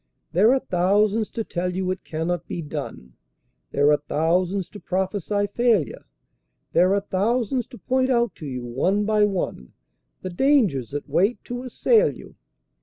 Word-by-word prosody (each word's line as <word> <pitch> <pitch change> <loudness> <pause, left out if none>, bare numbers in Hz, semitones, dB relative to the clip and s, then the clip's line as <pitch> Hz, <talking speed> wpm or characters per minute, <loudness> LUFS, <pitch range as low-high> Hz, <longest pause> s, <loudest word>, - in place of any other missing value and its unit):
There 205 +7 +5
are 270 - +4
thousands 205 +3 +1
to 225 - -4
tell 180 -2 -3
you 185 0 -1
it 185 - -5
cannot 165 +2 -3
be 170 - -4
done, 145 - -7 0.6
There 145 +1 +3
are 150 - +5
thousands 170 +6 0
to 205 - -11
prophesy 195 +2 -1
failure; 230 - +1 0.7
There 185 +3 +4
are 200 - +1
thousands 230 +5 0
to 245 - -12
point 260 +1 0
out 235 -3 +2
to 155 - -7
you 125 -2 -5
one 180 +13 0
by 215 -1 +3
one, 180 - -3 0.5
The 185 - -4
dangers 200 - +2
that 145 +1 -5
wait 200 +7 +2
to 245 0 -5
assail 440 - +2
you. - - -13
190 Hz, 160 wpm, -23 LUFS, 165-225 Hz, 0.7 s, There